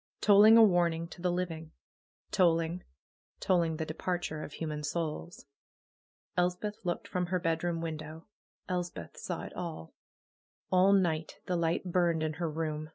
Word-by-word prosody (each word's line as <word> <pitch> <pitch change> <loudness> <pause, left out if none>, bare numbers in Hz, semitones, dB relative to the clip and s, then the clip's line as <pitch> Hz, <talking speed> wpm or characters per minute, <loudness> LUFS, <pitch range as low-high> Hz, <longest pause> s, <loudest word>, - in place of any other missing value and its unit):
Tolling 210 +2 +7
a 230 - +9
warning 170 -4 +3
to 175 - -11
the 180 0 +1
living 175 -3 -3
I - - -51
Tolling! 170 -1 +2 0.6
Tolling 170 -4 +1
the 160 - -2
departure 160 0 -3
of 150 - -7
human 150 -2 -4
souls! 160 +2 -4 0.9
Elspeth 180 +4 -1
looked 175 -2 -2
from 180 -1 -2
her 185 +1 0
bedroom 165 0 -1
window. 155 0 -6 0.4
Elspeth 175 - -4
saw - - -4
it - - -8
all. 165 - -6 0.8
All 185 +1 +5
night 165 -5 +1
the 180 - -1
light 170 -1 0
burned 170 -3 +2
in 155 0 -1
her 165 - 0
room. 155 -1 -3
170 Hz, 150 wpm, -31 LUFS, 160-180 Hz, 0.9 s, a